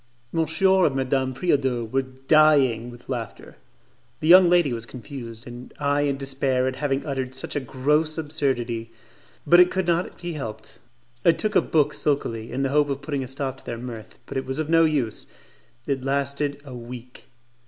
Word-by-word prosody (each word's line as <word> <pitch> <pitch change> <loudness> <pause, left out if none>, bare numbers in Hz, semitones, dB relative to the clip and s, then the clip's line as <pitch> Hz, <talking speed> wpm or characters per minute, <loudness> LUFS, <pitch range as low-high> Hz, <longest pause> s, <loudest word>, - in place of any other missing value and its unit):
Monsieur 170 +4 +3
and 135 - -2
Madame 130 0 0
Preodot 130 -5 0
were 135 - +3
dying 130 -2 +3
with 120 0 -14
laughter; 120 -5 -6 0.6
the 155 - -2
young 180 +1 +8
lady 175 -7 +3
was 115 -1 -5
confused, 120 -3 -9
and 120 +1 -10
I 145 0 +1
in 140 -1 0
despair 135 -1 0
at 130 - -3
having 140 -1 -1
uttered 130 -3 -3
such 130 - -7
a - - +1
gross 150 +5 0
absurdity; 130 -7 -2 0.6
but 175 - +6
it 180 0 +7
could 190 -1 -1
not 175 +1 -1
be 175 -1 -5
helped. 110 -7 -7 0.4
I 170 - +6
took 215 +2 -2
a - - +6
book 150 -2 +1
sulkily, 115 -6 -1
in 130 +3 -2
the 135 - +1
hope 145 +1 +2
of 140 0 -3
putting 140 -2 -2
a - - -6
stop 135 0 -4
to - - -19
their 120 - -5
mirth, 115 -2 -8
but - - -5
it 130 - -2
was 130 +1 -3
of 155 0 -2
no 165 0 +6
use: 140 -9 -1 0.6
it 135 -2 -2
lasted 140 +1 -1
a 130 -3 -8
week. 120 +1 -10
135 Hz, 185 wpm, -24 LUFS, 125-150 Hz, 0.6 s, young